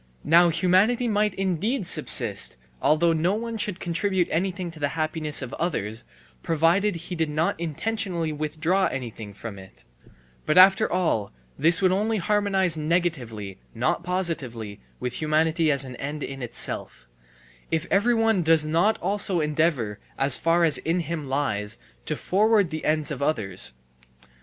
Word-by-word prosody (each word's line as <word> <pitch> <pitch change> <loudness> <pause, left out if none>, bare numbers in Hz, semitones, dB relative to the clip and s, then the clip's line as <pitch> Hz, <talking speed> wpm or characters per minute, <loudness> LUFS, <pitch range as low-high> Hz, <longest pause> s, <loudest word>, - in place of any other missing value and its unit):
Now 170 +3 +5
humanity 190 +8 +2
might 210 -1 +1
indeed 195 - -1
subsist, 170 - -1 0.2
although 165 +2 +3
no 170 +5 +1
one 230 0 -4
should 200 -3 -2
contribute 180 +1 0
anything 180 +1 -2
to 160 - -11
the 145 - +1
happiness 155 -2 -1
of 130 - -7
others, 115 - -2 0.4
provided 170 +5 +2
he 170 +2 -6
did 160 -2 -1
not 155 +2 -1
intentionally 170 0 -2
withdraw 155 +5 0
anything 115 -5 -6
from 100 0 -8
it; 95 -11 -15 0.6
but 155 - +2
after 190 +1 +6
all 165 - 0 0.2
this 165 +5 +3
would 185 - +4
only 215 +4 0
harmonize 195 -3 +1
negatively 150 - -2 0.2
not - - 0
positively 140 - -3 0.2
with 125 +4 -3
humanity 160 +1 +2
as 140 -2 +1
an 125 -1 -8
end 145 +1 -5
in 135 -1 -6
itself, 115 - -2 0.6
if 160 +1 -1
every 235 +5 +3
one 225 -4 +2
does 160 -2 +4
not 170 +8 +2
also 195 -1 +1
endeavour, 150 -8 0 0.2
as 135 -1 +4
far 170 +1 +2
as 155 -3 +4
in 170 +3 -1
him 160 -4 -5
lies, 105 -7 -1 0.3
to - - -1
forward 205 -1 +2
the 155 0 -5
ends 155 0 0
of 140 - -5
others. 100 - +1
165 Hz, 150 wpm, -25 LUFS, 145-185 Hz, 0.6 s, after